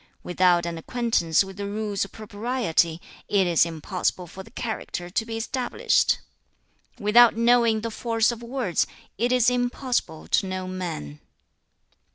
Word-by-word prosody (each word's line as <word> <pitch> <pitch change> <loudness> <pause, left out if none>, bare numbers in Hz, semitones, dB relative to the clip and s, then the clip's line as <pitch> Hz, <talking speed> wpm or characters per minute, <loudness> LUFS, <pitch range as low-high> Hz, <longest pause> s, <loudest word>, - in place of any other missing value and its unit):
2. - - -10
'Without 180 -1 +3
an 170 -1 -4
acquaintance 200 -5 +1
with 195 0 -10
the 200 0 -4
rules 205 -1 -2
of 200 - -7
Propriety, 210 -6 -1 0.3
it 200 -2 +3
is 170 -1 +3
impossible 175 +2 -2
for 180 +3 -10
the 190 - -13
character 220 -7 -5
to 220 +4 0
be 225 0 -4
established. 245 +2 +1 0.8
3. 235 - -13
'Without 230 +2 +6
knowing 235 -2 +4
the 230 +1 -4
force 230 +1 +1
of 235 -1 -7
words, 235 -7 -1 0.3
it 240 +2 +1
is 250 -2 +3
impossible 245 - -1
to 195 - +1
know 185 0 -4
men.' 170 - -5
210 Hz, 155 wpm, -25 LUFS, 180-235 Hz, 0.8 s, Without